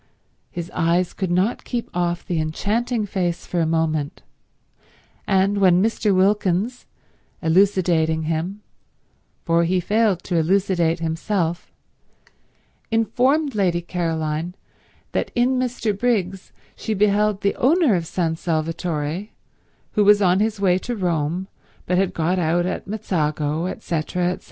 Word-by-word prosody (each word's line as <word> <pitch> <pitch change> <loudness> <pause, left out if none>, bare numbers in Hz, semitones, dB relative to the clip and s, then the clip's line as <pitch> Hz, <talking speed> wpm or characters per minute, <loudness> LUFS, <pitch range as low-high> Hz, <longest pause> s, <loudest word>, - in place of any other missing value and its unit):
His 170 0 -6
eyes 175 +1 +1
could 190 -3 -3
not 185 +7 +1
keep 240 -1 -3
off 175 0 -1
the 170 -3 -1
enchanting 215 +8 -1
face 180 -4 -2
for 175 - -2
a 165 - +2
moment; 155 -2 -1 1.0
and 195 +1 +2
when 180 -2 +5
Mr. 220 -1 +1
Wilkins, 200 +4 +1 0.5
elucidating 165 -3 +2
him, 165 +6 -3 0.8
for 170 0 +3
he 180 +2 +1
failed 205 0 +1
to 175 - -1
elucidate 170 -1 +1
himself, 170 +1 -2 1.2
informed 260 +6 +1
Lady 185 -5 +1
Caroline 165 -1 -2 0.6
that - - -1
in 250 +1 +2
Mr. 235 -4 -1
Briggs 195 -4 -1 0.2
she 220 - -3
beheld 210 0 +2
the 200 - +1
owner 300 - +3
of 170 -3 -1
San 165 -2 -1
Salvatore, 165 +1 -2 0.6
who 210 - +2
was 205 0 +6
on 185 -1 +3
his 215 0 0
way 185 -2 +3
to 240 +5 -4
Rome, 175 -1 -1 0.4
but 180 0 +1
had 190 -1 0
got 175 +3 +1
out 175 +1 +1
at 185 - -4
Mezzago, 160 -6 -1
etc. - - -2 0.6
etc. 180 - -3
180 Hz, 130 wpm, -22 LUFS, 165-205 Hz, 1.2 s, was